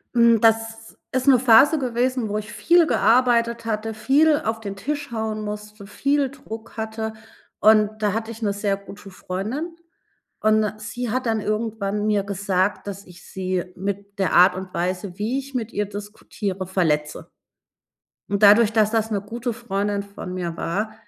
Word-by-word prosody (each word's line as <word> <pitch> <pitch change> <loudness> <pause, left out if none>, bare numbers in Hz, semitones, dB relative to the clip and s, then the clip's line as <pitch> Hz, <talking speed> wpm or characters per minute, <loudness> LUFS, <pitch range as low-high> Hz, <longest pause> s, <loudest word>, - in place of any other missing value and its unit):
Hm, 235 -1 +5
das 225 0 +1
ist 260 +1 -1
'ne 260 -3 +7
Phase 260 +6 +6
gewesen, 250 -2 -1
wo 210 - -1
ich 210 0 -6
viel 340 +6 +4
gearbeitet 235 -1 +3
hatte, 220 0 -2
viel 290 +7 +3
auf 225 0 -1
den 200 -3 -6
Tisch 285 +7 -4
hauen 220 -1 -3
musste, 210 -1 -7
viel 280 +5 0
Druck 230 -6 -10
hatte 220 0 -4 0.5
und 215 0 +4
da 205 -2 +1
hatte 225 +1 -3
ich 225 - -10
'ne 205 -2 0
sehr 205 -1 -1
gute 200 0 -12
Freundin. 215 - -5 0.7
Und 215 0 +3
'ne 210 -1 -1
sie 225 +3 -5
hat 255 +2 -1
dann 225 -1 +1
irgendwann 210 -1 -2
mir 205 -2 +1
gesagt, 200 0 -1
dass 200 0 -6
ich 180 -1 -15
sie 185 -1 -3
mit 200 +2 -5
der 190 - +1
Art 180 +1 +6
und 185 -1 -7
Weise, 180 +1 -3
wie 230 +6 -1
ich 275 0 -8
mit 235 -3 -3
ihr 205 0 -1
diskutiere, 205 -1 -6
verletze. 155 -5 -1 1.0
Und 200 +1 -1
dadurch, 210 +2 +7
dass 215 -1 +3
das 225 -1 0
'ne 205 -2 0
gute 235 +4 -4
Freundin 205 -3 -2
von 200 -2 -8
mir 175 -2 -4
war, 210 +6 -2
215 Hz, 170 wpm, -23 LUFS, 200-230 Hz, 1.0 s, ne